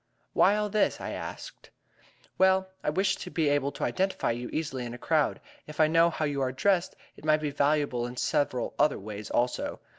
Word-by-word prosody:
"Why 205 - +5
all 210 0 0
this?" 210 +1 +1
I - - -5
asked. - - -8 0.7
"Well, 190 0 +4 0.2
I - - +1
wish 190 +4 +1
to 180 - -7
be 160 -4 +1
able 145 -1 +1
to - - -5
identify 190 -8 0
you 120 +1 -4
easily 145 -5 -3
in 120 0 -6
a - - -8
crowd. 155 +3 +1 0.3
If 150 0 -10
I 155 - +7
know 165 +1 +5
how 160 -1 -2
you 145 -2 -1
are 130 -1 0
dressed, 180 +6 +1 0.2
it - - -16
might 155 0 +4
be 150 -1 -3
valuable 140 -4 +1
in 125 +1 -9
several 140 -4 0
other 150 - +3
ways 105 +1 -7
also. 120 +1 -1
150 Hz, 205 wpm, -28 LUFS, 130-175 Hz, 0.7 s, I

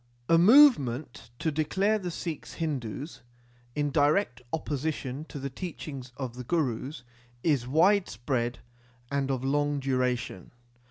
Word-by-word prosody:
) 120 - -36
A 165 - +6
movement 155 - +5
to 160 - -1
declare 195 +8 +1
the 180 -3 -4
Sikhs 165 -2 -5
Hindus, 145 -2 -4 0.5
in 145 -1 0
direct 145 -2 +2
opposition 150 -2 -3
to 155 - -9
the 140 0 -4
teaching 150 -4 -6
of 130 -4 -4
the 125 +1 -7
Gurus, 130 -2 -2 0.4
is 140 -7 +2
widespread 135 - +1 0.5
and 140 -1 0
of 130 -2 -1
long 145 +1 +1
duration. 125 -7 -1
145 Hz, 125 wpm, -28 LUFS, 125-160 Hz, 0.5 s, A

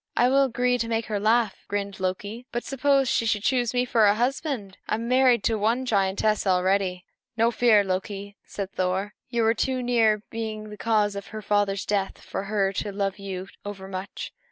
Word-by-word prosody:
"I 245 +1 +5
will 275 +1 +4
agree 250 0 +1
to 230 - -1
make 225 -1 -1
her 210 -2 -2
laugh," 220 0 +2
grinned 200 -1 -3
Loki; 205 +6 -3
"but 240 - -2
suppose 275 0 +2
she 230 - +1
should 210 -1 0
choose 245 -2 +2
me 250 0 +1
for 225 -3 +4
her 205 - +4
husband! 245 - -2
I - - +2
am 230 +2 -4
married 250 -3 +4
to 225 -2 +1
one 230 +5 +1
giantess 200 -1 +1
already." 185 0 +1 0.3
"No 230 +1 +3
fear 225 -2 +5
of - - -4
that, 190 - +1
Loki," 200 +1 -5
said 195 -1 -6
Thor; 190 +2 -1 0.2
"you 235 -2 0
were 225 0 +4
too 255 +2 -1
near 225 -4 +3
being 215 -2 -5
the - - -7
cause 210 -2 +1
of 200 - -6
her 215 -1 -7
father's 200 -1 +1
death 200 -2 -1
for 195 - -5
her 200 -1 0
to 205 +1 -3
love 195 0 -2
you 190 -1 -5 0.2
overmuch. 195 -1 -6
215 Hz, 205 wpm, -25 LUFS, 195-235 Hz, 0.3 s, I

